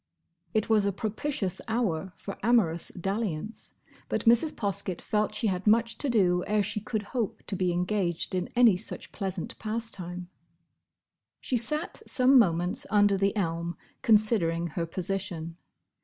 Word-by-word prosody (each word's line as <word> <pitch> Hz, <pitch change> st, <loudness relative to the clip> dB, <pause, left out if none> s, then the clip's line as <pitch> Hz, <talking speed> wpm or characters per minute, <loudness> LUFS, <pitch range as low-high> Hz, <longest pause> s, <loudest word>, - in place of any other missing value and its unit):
It 215 Hz, -, +2 dB
was 215 Hz, -2 st, +3 dB
a -, -, +2 dB
propitious 205 Hz, -1 st, -2 dB
hour 195 Hz, -6 st, -1 dB
for 200 Hz, -, -7 dB
amorous 200 Hz, -8 st, +2 dB
dalliance, 195 Hz, +1 st, -4 dB, 0.3 s
but -, -, -1 dB
Mrs. 235 Hz, +7 st, +5 dB
Poskett 195 Hz, -4 st, -2 dB
felt 210 Hz, -1 st, -1 dB
she 215 Hz, -, 0 dB
had 190 Hz, -1 st, -1 dB
much 230 Hz, +2 st, +3 dB
to 285 Hz, -, -1 dB
do 180 Hz, -6 st, +3 dB
ere 210 Hz, 0 st, +2 dB
she 210 Hz, +2 st, -2 dB
could 215 Hz, 0 st, -3 dB
hope 235 Hz, -6 st, -2 dB
to -, -, -3 dB
be 180 Hz, -1 st, +1 dB
engaged 180 Hz, -1 st, -1 dB
in 180 Hz, -1 st, -1 dB
any 235 Hz, -6 st, +6 dB
such 210 Hz, -, -7 dB
pleasant 190 Hz, -3 st, -4 dB
pastime. 200 Hz, -6 st, -4 dB, 1.1 s
She 255 Hz, -, -2 dB
sat 300 Hz, +8 st, -1 dB
some 255 Hz, +1 st, +5 dB
moments 175 Hz, -4 st, +1 dB
under 205 Hz, -2 st, +4 dB
the 195 Hz, +2 st, +1 dB
elm 170 Hz, -3 st, -2 dB, 0.2 s
considering 205 Hz, -7 st, +3 dB
her 165 Hz, +2 st, -3 dB
position. 175 Hz, -2 st, -4 dB
200 Hz, 145 wpm, -28 LUFS, 180-225 Hz, 1.1 s, any